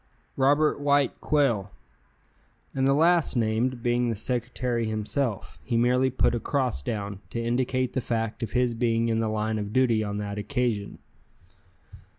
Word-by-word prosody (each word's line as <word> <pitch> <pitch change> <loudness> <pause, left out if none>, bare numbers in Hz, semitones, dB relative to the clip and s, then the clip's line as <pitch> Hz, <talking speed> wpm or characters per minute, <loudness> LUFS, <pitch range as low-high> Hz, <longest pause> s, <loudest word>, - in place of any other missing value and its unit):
"Robert 145 +3 +3
White 145 -1 +1
Quail." 120 -10 +1 1.0
And 135 0 +1
the 135 - +4
last 165 0 +3
named 115 +2 0
being 120 0 +1
the 115 - -1
secretary 120 +1 -2
himself, 110 +1 -3
he 120 - -1
merely 125 +2 +3
put 130 - +1
a 120 - 0
cross 130 - -1
down, 100 - -4
to 115 - -4
indicate 125 +2 0
the 130 - -1
fact 115 -2 -2
of 115 -3 -4
his 125 -1 +2
being 115 0 +1
in 115 0 +1
the 110 -1 0
line 110 0 -1
of 105 0 -5
duty 120 -4 +3
on 105 -1 -3
that 105 0 -4
occasion. 110 -2 -2
120 Hz, 160 wpm, -26 LUFS, 110-130 Hz, 1.0 s, the